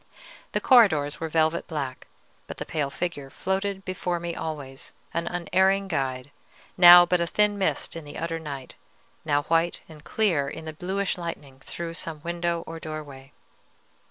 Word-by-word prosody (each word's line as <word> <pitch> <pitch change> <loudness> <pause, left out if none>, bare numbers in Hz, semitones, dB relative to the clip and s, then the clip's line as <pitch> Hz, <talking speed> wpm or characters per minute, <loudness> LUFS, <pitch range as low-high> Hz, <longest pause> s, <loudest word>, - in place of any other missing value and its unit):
The - - +2
corridors 190 - +4
were 160 - -3
velvet 160 +1 +1
black; 140 -5 -5 0.4
but - - -8
the - - -5
pale 145 -3 -2
figure 145 -2 -4
floated 195 +5 -2
before 180 -2 -2
me 170 0 -4
always, 145 -5 -6 0.2
an 170 - -2
unerring 190 +3 +2
guide, 135 -5 -2 0.4
now 175 -1 +10
but 180 0 +1
a 170 - 0
thin 210 +3 +2
mist 195 -3 -1
on 165 - -6
the 145 - -9
utter 165 0 -3
night, 140 -4 -7 0.5
now 145 -1 +1
white 165 +2 +1
and 155 -2 -14
clear 170 -10 +1
in 160 - -8
the 155 - -6
bluish 190 +4 -2
lightning 145 -6 -7
through 165 +4 -6
some 165 -2 -5
window 170 0 -1
or 165 0 -7
doorway. 145 -4 -8
165 Hz, 160 wpm, -26 LUFS, 145-180 Hz, 0.5 s, now